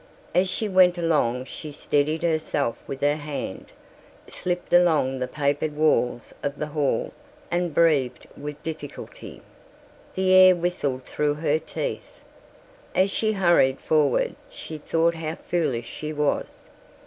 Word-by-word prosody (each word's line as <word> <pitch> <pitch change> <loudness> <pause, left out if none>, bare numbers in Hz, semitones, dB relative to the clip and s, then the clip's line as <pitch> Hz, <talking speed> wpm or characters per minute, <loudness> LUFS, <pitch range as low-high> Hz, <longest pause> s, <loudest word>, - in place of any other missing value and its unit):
As 185 +1 +3
she 215 - -1
went 185 -2 +5
along 145 -7 +1
she 150 +2 -6
steadied 150 +2 0
herself 155 -7 0
with 135 0 -6
her 145 +1 +2
hand, 150 -1 -6 0.6
slipped 180 -1 -4
along 160 -7 +4
the 125 - -2
papered 145 +2 -1
walls 135 -6 +1
of 140 0 -3
the 150 - -2
hall 145 -3 0 0.4
and 175 0 0
breathed 145 -5 +2
with 150 +1 -8
difficulty. 155 -3 -8 0.7
The 185 0 +2
air 185 -1 +8
whistled 155 -7 -2
through 150 +2 -1
her 155 0 +1
teeth. 330 - -5 0.8
As 190 +1 +3
she 220 +1 +1
hurried 175 -9 +3
forward 150 -4 +2 0.2
she 155 -1 -8
thought 165 +3 +1
how 160 -1 -4
foolish 150 -11 -2
she 155 0 -6
was. 150 -1 -2
155 Hz, 135 wpm, -24 LUFS, 145-175 Hz, 0.8 s, air